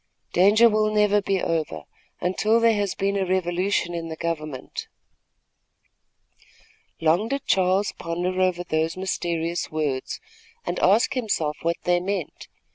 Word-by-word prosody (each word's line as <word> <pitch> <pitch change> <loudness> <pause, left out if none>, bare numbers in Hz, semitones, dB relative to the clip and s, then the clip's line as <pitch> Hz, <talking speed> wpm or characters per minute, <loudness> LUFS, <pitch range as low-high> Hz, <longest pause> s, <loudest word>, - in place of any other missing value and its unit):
"Danger 205 +6 +6 0.2
never 210 -1 +2
will - - +2
be 195 -1 0
over, 155 - -2 0.4
until 215 +5 +2
there 230 -1 +4
has 205 -2 -1
been 200 +1 0
a 195 - +1
revolution 180 0 0
in 165 -1 -4
the 160 - -5
government." 155 -5 -5 2.1
Long 165 +7 +2
did 275 +2 -3
Charles 190 +2 +2
ponder 180 +2 -2
over 180 -1 +1
those 160 0 -1
mysterious 170 -2 -2
words, 150 -4 -2 0.5
and 175 +1 -2
ask 215 +8 +4
himself 200 - -1
what 170 +1 0
they 175 0 +2
meant. 185 -3 -4
180 Hz, 130 wpm, -24 LUFS, 165-200 Hz, 2.1 s, Danger